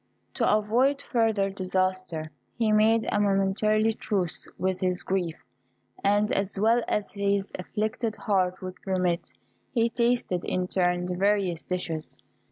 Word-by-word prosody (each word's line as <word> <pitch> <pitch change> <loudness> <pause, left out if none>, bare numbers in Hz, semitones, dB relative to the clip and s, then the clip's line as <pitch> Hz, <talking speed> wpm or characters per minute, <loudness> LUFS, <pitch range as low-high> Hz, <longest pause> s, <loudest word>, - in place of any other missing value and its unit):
To - - +2
avoid 235 +7 +2
further 220 -7 +1
disaster, 185 -4 -2 0.3
he 225 -2 +2
made 220 +1 +4
a 205 - +1
momentary 205 +2 +2
truce 195 -6 -1
with 185 0 -1
his 180 -1 0
grief, 180 -4 -1 0.7
and, 205 +1 +3
as 195 0 0
well 230 +3 +4
as 210 -1 -1
his 200 -1 0
afflicted 215 +3 -2
heart 185 -3 0
would 185 0 -7
permit, 180 -3 -1 0.4
he 230 -1 +2
tasted, 235 -7 0
in 180 0 -1
turn, 180 -1 +1
the 180 - -2
various 190 -3 +1
dishes. 165 -4 -4
195 Hz, 135 wpm, -27 LUFS, 185-215 Hz, 0.7 s, made